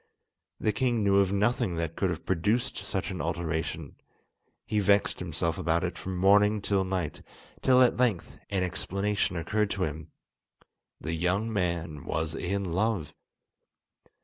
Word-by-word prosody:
The 110 - +1
king 120 -1 +1
knew 100 -1 +4
of 95 -1 +3
nothing 105 -1 +1
that 85 0 -3
could 95 - 0
have 85 -2 -4
produced 105 +8 0
such - - -3
an - - -4
alteration. 80 -1 -3 0.7
He 105 - 0
vexed 100 0 +3
himself 85 -1 -2
about 85 +1 +1
it 90 -1 -2
from 95 -1 -5
morning 105 +3 +5
till 100 -1 +1
night, 95 -5 -3 0.4
till 130 -1 +6
at 125 - +3
length 110 -10 0
an 95 -2 0
explanation 95 +2 -1
occurred 105 +5 0
to 95 -1 -1
him—the 80 +1 -9
young 95 +7 0
man 85 -6 -2
was 80 0 -2
in 95 +4 -2
love! 95 -1 -1
95 Hz, 145 wpm, -28 LUFS, 85-105 Hz, 0.7 s, till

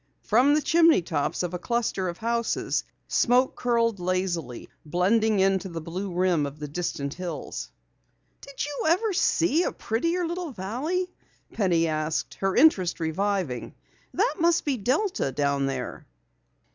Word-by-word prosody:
From 255 +7 +4
the 305 - +1
chimney 325 - +5
tops 155 +1 -1
of 180 0 -3
a 180 - -3
cluster 230 -5 -1
of 170 - -6
houses 235 0 -1 0.2
smoke 250 +2 +3
curled 230 -4 +1
lazily, 175 -8 -2 0.2
blending 200 +6 +2
into 190 0 +2
the 165 -1 -5
blue 180 +5 -5
rim 175 -4 +1
of 140 +1 -9
the 150 0 -6
distant 145 -2 -3
hills. 180 -1 -6 0.7
"Did 280 0 -5
you 290 -1 -4
ever 390 +6 +2
see 340 -3 +2
a - - 0
prettier 335 +11 -1
little 345 -3 -4
valley?" 300 - -3 0.4
Penny 175 -6 +2
asked, 155 0 -2
her 195 -1 0
interest 205 - +4
reviving. 165 -5 -2 0.4
"That 425 +4 +1
must 340 +1 +3
be 285 -3 +1
Delta 255 - 0
down 140 0 0
there." 135 - -5
195 Hz, 145 wpm, -26 LUFS, 170-280 Hz, 0.7 s, chimney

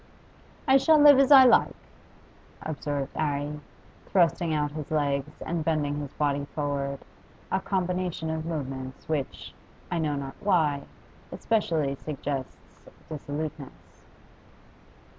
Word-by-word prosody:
'I 265 0 +7
shall 310 +3 +5
live 290 -2 +8
as 275 +1 +4
I 270 -2 +11
like,' 245 - +4 0.9
observed 145 -2 -3
'Arry, 145 -1 -2 0.5
thrusting 170 -2 +2
out 150 -1 0
his 150 -1 -6
legs 145 -1 -1
and 165 -1 -2
bending 150 -2 0
his 145 -2 -6
body 145 -1 0
forward, 140 -2 -3 0.5
a 190 - +2
combination 180 -4 -2
of 160 0 -3
movements 135 -5 -5
which, 150 -4 -3 0.4
I 175 - 0
know 150 -2 0
not 135 -1 -5
why, 155 -8 +2 0.5
especially 165 -11 0
suggests 140 -2 -6 0.2
dissoluteness. 150 -1 -7
150 Hz, 115 wpm, -27 LUFS, 140-170 Hz, 0.9 s, I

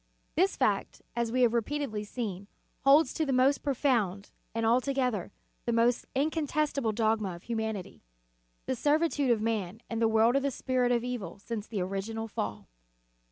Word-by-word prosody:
This 380 +4 +2
fact, - - 0
as 235 -1 0
we 255 +1 +3
have 235 -1 +4
repeatedly 235 -2 -1
seen, 205 -3 -5 0.3
holds 285 +4 +5
to 320 - 0
the 280 - -1
most 265 +2 +3
profound, 235 -9 0 0.2
and, 225 0 0
altogether, 250 -4 +1 0.4
the - - +2
most 235 +1 +2
incontestable 295 -3 0
dogma 215 -4 0
of 170 - -13
humanity; 220 -5 -4 0.6
the - - -1
servitude 295 -2 +2
of 225 -3 +2
man 215 -3 -1
and 230 0 -1
the 225 - +5
world 225 +2 +4
to 275 - +4
the 280 0 0
Spirit 255 -1 0
of 240 -1 +2
evil 245 -6 -4
since 215 +1 -5
the 210 -5 -3
original 200 +4 -3
fall. 105 - -4
235 Hz, 160 wpm, -30 LUFS, 215-270 Hz, 0.6 s, holds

